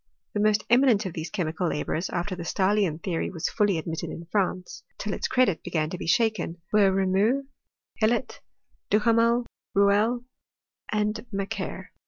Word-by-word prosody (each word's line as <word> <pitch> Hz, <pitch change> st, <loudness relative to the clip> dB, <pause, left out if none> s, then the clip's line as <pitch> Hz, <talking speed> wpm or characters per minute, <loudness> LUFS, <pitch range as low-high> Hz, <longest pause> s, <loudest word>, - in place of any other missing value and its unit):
The 210 Hz, -, -1 dB
most 215 Hz, 0 st, +2 dB
eminent 240 Hz, -3 st, +4 dB
of 185 Hz, -, -4 dB
these 160 Hz, 0 st, -5 dB
chemical 175 Hz, -3 st, -2 dB
labourers, 160 Hz, +3 st, -2 dB
after 185 Hz, +2 st, -2 dB
the 180 Hz, -, -7 dB
Stahlian 185 Hz, -2 st, +1 dB
theory 170 Hz, -3 st, -1 dB
was 165 Hz, -4 st, -3 dB
fully 205 Hz, -5 st, +2 dB
ad 160 Hz, -, -4 dB
mitted 165 Hz, -1 st, -4 dB
in 170 Hz, -, -7 dB
France 185 Hz, -3 st, -1 dB, 0.2 s
till 205 Hz, -1 st, -3 dB
its -, -, -2 dB
credit 245 Hz, -10 st, +2 dB
began 155 Hz, -1 st, -2 dB
to 180 Hz, -, -4 dB
be -, -, -5 dB
shaken, 215 Hz, -5 st, +1 dB
were 205 Hz, -2 st, +5 dB
Reaumur, 195 Hz, +8 st, +2 dB, 0.6 s
Hellot, 235 Hz, +3 st, +1 dB, 0.5 s
Duhamel, 230 Hz, +2 st, +3 dB, 0.3 s
Rouelle, 205 Hz, +5 st, +3 dB, 0.7 s
and 210 Hz, 0 st, 0 dB
Mac 195 Hz, -1 st, -3 dB
quer. -, -, -6 dB
200 Hz, 160 wpm, -26 LUFS, 175-220 Hz, 0.7 s, were